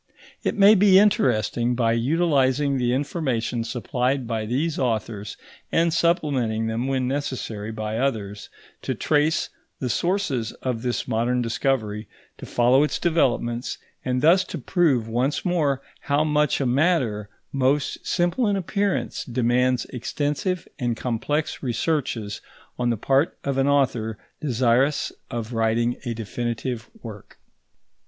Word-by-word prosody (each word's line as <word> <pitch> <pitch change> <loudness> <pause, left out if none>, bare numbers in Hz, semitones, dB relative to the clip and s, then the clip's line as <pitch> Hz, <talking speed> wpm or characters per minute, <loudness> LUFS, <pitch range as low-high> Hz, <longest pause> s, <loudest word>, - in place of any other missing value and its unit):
It - - -1
may 200 +1 +8
be 195 -2 +6
interesting, 125 - +2
by 115 -2 +2
utilising 140 0 +2
the 120 -1 +1
information 130 -4 -1
supplied 125 +2 -1
by 110 -2 -3
these 145 +7 -1
authors 110 -4 -2 0.3
and 165 0 +2
supplementing 140 -10 +1
them 115 +3 -2
when 130 -2 0
necessary 130 -6 -3
by 110 0 -3
others, 105 -6 -2 0.3
to - - -2
trace 155 +1 +1 0.3
the 125 -2 -2
sources 170 - -1
of 125 -3 -3
this 125 -1 -2
modern 120 +1 +1
discovery, 115 -3 -1 0.3
to - - -8
follow 125 +3 +4
its 150 - +1
developments, 125 -7 0 0.3
and 125 +1 -1
thus 175 +4 +6
to - - -6
prove 135 -5 +1
once 125 +9 -1
more 150 -7 +1 0.2
how 145 +1 +1
much 150 -1 +2
a 140 - 0
matter, 125 - +1 0.2
most 135 +1 0
simple 175 +7 +1
in 205 - +2
appearance, 200 +1 -1
demands 125 +1 +1
extensive 150 - -2
and 120 -3 -1
complex 145 +6 -2
researches 120 -5 -2 0.4
on 120 -1 +1
the 115 - 0
part 135 +8 +1
of 140 -1 -1
an 135 - +2
author 120 -6 +1 0.2
desirous 130 +1 +2 0.2
of 120 0 -4
writing 115 +1 +1
a 120 -1 -2
definitive 120 +2 -4
work. 105 -3 -10
130 Hz, 130 wpm, -24 LUFS, 115-150 Hz, 0.4 s, may